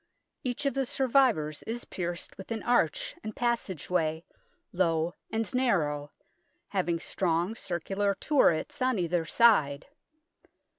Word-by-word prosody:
Each 250 +3 -3
of 275 - +2
the 270 -2 -1
survivors 255 - +2
is 235 +2 -4
pierced 175 -1 -5
with 190 - -10
an 225 -2 -3
arch 240 -11 +1
and 215 0 -6
passage 235 -9 -1
way, 160 -2 0 0.5
low 170 -2 +1 0.2
and 225 0 -2
narrow, 150 - +1 0.6
having 170 +1 0
strong 175 +2 0
circular 195 0 -1
turrets 290 - +2
on 255 -2 +2
either 175 -2 0
side. 155 -8 +4
190 Hz, 120 wpm, -29 LUFS, 165-240 Hz, 0.6 s, side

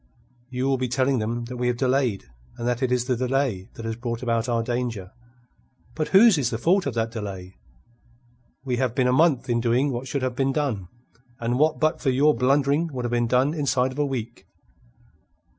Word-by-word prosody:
"You 130 +1 -2
will 135 -1 +1
be 130 - -1
telling 130 +1 +1
them 115 +2 -3
that 125 +1 -7
we 125 0 -1
have 120 -1 0
delayed, 130 -5 0 0.3
and 120 - -3
that 125 +1 -1
it 130 -2 0
is 125 -1 +1
the 125 -1 0
delay 125 -6 -1
that 115 - -8
has 115 0 -3
brought 120 0 -5
about 115 0 0
our 115 -1 +1
danger. 120 -6 -3 0.8
But 155 -1 -2
whose 195 -3 +6
is 125 -4 0
the 115 - -3
fault 175 - +2
of 130 - -3
that 115 0 -1
delay? 95 -4 -7 1.1
We 125 -2 -1
have 125 -2 -1
been 130 -2 +2
a 125 - +3
month 145 -3 +3
in 120 -1 +1
doing 125 +4 +1
what 125 +1 -4
should 135 +1 -2
have 130 -1 -2
been 135 +1 0
done, 130 - -2 0.5
and 120 +2 -1
what 155 +1 +2
but 155 +1 +1
for 135 - +1
your 140 +4 +4
blundering 140 +5 +2
would 125 -3 -4
have 120 - -2
been 120 -1 +1
done, 130 +5 +2
inside 130 -4 0
of 130 - -8
a - - +3
week." 120 -3 -6
125 Hz, 210 wpm, -24 LUFS, 120-135 Hz, 1.1 s, whose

